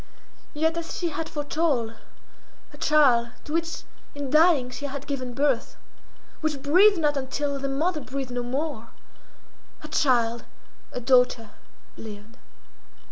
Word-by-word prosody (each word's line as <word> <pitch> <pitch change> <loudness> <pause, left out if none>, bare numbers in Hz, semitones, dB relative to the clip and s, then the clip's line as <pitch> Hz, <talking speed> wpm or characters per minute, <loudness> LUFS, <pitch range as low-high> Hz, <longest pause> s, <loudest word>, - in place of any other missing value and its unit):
Yet, 320 +2 +1
as 335 0 -4
she 345 - -1
had 320 0 -4
foretold, 290 -6 0 0.8
her - - -14
child, 260 -6 +4
to 300 - -7
which 330 0 -2 0.3
in 285 -2 -4
dying 305 -5 +4
she 285 - -6
had 280 0 -6
given 255 -4 -4
birth, 275 -3 0 0.6
which 310 -3 -1
breathed 375 +8 +6
not 300 -3 +1
until 275 +1 -2
the 275 0 -2
mother 305 +4 0
breathed 265 -1 -5
no 245 0 -2
more, 260 0 -3 0.9
her 305 - -9
child, 240 -6 +2 0.5
a - - -4
daughter, 250 -3 +3 0.5
lived. 220 +1 -10
280 Hz, 135 wpm, -25 LUFS, 250-310 Hz, 0.9 s, breathed